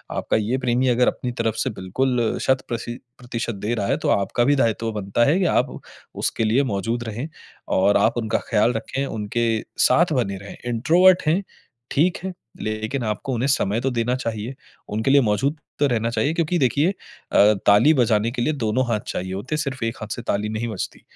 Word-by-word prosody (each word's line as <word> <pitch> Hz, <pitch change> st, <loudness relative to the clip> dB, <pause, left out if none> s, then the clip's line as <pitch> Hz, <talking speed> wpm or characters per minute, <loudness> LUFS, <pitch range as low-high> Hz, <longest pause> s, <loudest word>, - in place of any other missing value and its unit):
आपका -, -, 0 dB
ये 110 Hz, +5 st, 0 dB
प्रेमी 125 Hz, 0 st, +1 dB
अगर 125 Hz, 0 st, +3 dB
अपनी 125 Hz, -, -1 dB
तरफ 115 Hz, -1 st, 0 dB
से -, -, -1 dB
बिल्कुल 120 Hz, +5 st, -1 dB
शत 130 Hz, 0 st, +2 dB
प्रशि 120 Hz, +1 st, -4 dB, 0.2 s
प्रतिशत 120 Hz, -2 st, -4 dB
दे 105 Hz, +4 st, -2 dB
रहा 100 Hz, -3 st, -2 dB
है, -, -, +1 dB
तो -, -, -2 dB
आपका 100 Hz, +4 st, +1 dB
भी 145 Hz, +3 st, +3 dB
दायित्व 115 Hz, -3 st, 0 dB
बनता 105 Hz, +3 st, +1 dB
है 155 Hz, +8 st, +3 dB
कि 185 Hz, -, +2 dB
आप -, -, +1 dB, 0.4 s
उसके 115 Hz, -, -1 dB
लिए 120 Hz, +6 st, +3 dB
मौजूद 115 Hz, 0 st, -2 dB
रहें 115 Hz, +5 st, -5 dB, 0.5 s
और 100 Hz, +2 st, +4 dB
आप 115 Hz, -, +3 dB
उनका 110 Hz, -2 st, 0 dB
ख़याल 110 Hz, +2 st, +3 dB
रखें, 135 Hz, +4 st, -3 dB
उनके 115 Hz, 0 st, -1 dB, 0.2 s
साथ 170 Hz, -1 st, +4 dB
बने 100 Hz, -8 st, 0 dB
रहें। 100 Hz, +1 st, -10 dB
इंट्रोवर्ट 175 Hz, +10 st, +4 dB
हैं, 175 Hz, +6 st, +2 dB, 0.5 s
ठीक 170 Hz, +5 st, +2 dB
है, 190 Hz, -1 st, -4 dB, 0.3 s
लेकिन 110 Hz, +4 st, -3 dB
आपको 125 Hz, +5 st, -3 dB
उन्हें 125 Hz, +3 st, 0 dB
समय 110 Hz, -3 st, +1 dB
तो 135 Hz, -, 0 dB
देना 120 Hz, +1 st, 0 dB
चाहिए, 115 Hz, 0 st, -4 dB, 0.3 s
उनके 110 Hz, +6 st, 0 dB
लिए 140 Hz, -1 st, +6 dB
मौजूद 130 Hz, +8 st, 0 dB, 0.2 s
तो 145 Hz, -, +4 dB
रहना 115 Hz, -2 st, 0 dB
चाहिए। 140 Hz, +6 st, 0 dB
क्योंकि 170 Hz, +1 st, 0 dB
देखिए 140 Hz, +5 st, +2 dB
अ, 105 Hz, -, +1 dB
ताली 105 Hz, +10 st, +6 dB
बजाने 115 Hz, -3 st, +2 dB
के 120 Hz, -, -3 dB
लिए 155 Hz, +6 st, +1 dB
दोनों 125 Hz, -1 st, 0 dB
हाथ 110 Hz, -3 st, 0 dB
चाहिए 95 Hz, +1 st, -4 dB
होते 120 Hz, +11 st, -3 dB
हैं। 150 Hz, -, 0 dB
सिर्फ 130 Hz, -4 st, -4 dB
एक 115 Hz, +3 st, -2 dB
हाथ 110 Hz, -, -5 dB
से 120 Hz, -, -6 dB
ताली 105 Hz, -1 st, -1 dB
नहीं 110 Hz, +2 st, -3 dB
बजती। 105 Hz, -, -5 dB
120 Hz, 200 wpm, -22 LUFS, 110-135 Hz, 0.5 s, लिए